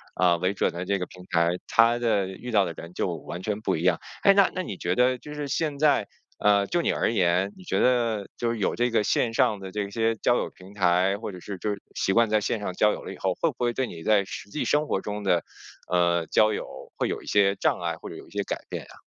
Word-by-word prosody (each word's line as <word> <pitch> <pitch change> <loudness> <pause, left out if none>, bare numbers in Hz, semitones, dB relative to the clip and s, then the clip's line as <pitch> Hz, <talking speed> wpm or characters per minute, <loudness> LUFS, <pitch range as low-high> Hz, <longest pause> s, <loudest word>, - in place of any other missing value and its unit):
呃， 90 -2 +3
为 90 +3 0
准 - - 0
的 85 +2 -5
这 100 +1 +1
个 90 - -3
平 90 -1 -13
台， 85 -1 +3 0.2
它 115 +1 +4
的 105 -5 +1
遇 120 +6 -7
到 105 -3 +4
的 90 - -3
人 85 +1 -9
就 - - -1
完 85 +3 -7
全 105 0 -2
不 110 - 0
一 80 - -3
样。 90 - +3 0.2
哎， 200 - +7
那 195 -1 +5
那 185 - -1
你 100 - -6
觉 90 +1 -1
得 125 +2 +3
就 150 +4 -10
是 150 -1 -4
现 150 0 -1
在， 150 0 +3 0.3
呃， 100 -1 +3
就 175 - +1
你 - - +1
而 - - +1
言， 90 -1 +2
你 95 - -13
觉 95 - 0
得 115 -5 +2
就 120 - -1
是 115 - -3
有 100 - 0
这 120 +1 +1
个 115 -2 +2
线 115 +2 +1
上 105 -2 +2
的 95 -1 -8
这 100 0 -3
些 115 +2 0
交 120 +2 +2
友 - - -2
平 95 +2 -15
台， 95 0 +2
或 105 0 -6
者 90 - -8
是 100 +1 -6
就 105 - -3
是 100 -1 -5
习 95 - +1
惯 115 +1 +4
在 110 0 +3
线 105 +2 -1
上 100 -2 -3
交 105 +3 +3
友 - - -7
了 - - -6
以 - - -11
后， 95 -1 0
会 165 - +3
不 - - -22
会 120 -1 0
对 130 0 -1
你 80 -1 -9
在 105 0 +4
实 100 - -8
际 150 - -3
生 150 +1 +1
活 95 - -1
中 105 0 -4
的， 90 -4 +2 0.5
呃， 85 -1 +2
交 110 +6 +3
友 - - -7
会 - - -1
有 - - -3
一 - - -15
些 100 -1 +3
障 - - +1
碍， - - -2
或 - - -9
者 - - -8
有 - - -11
一 - - -20
些 - - -2
改 - - -3
变 - - -5
呀？ - - -15
100 Hz, 300 characters per minute, -26 LUFS, 95-115 Hz, 0.5 s, 哎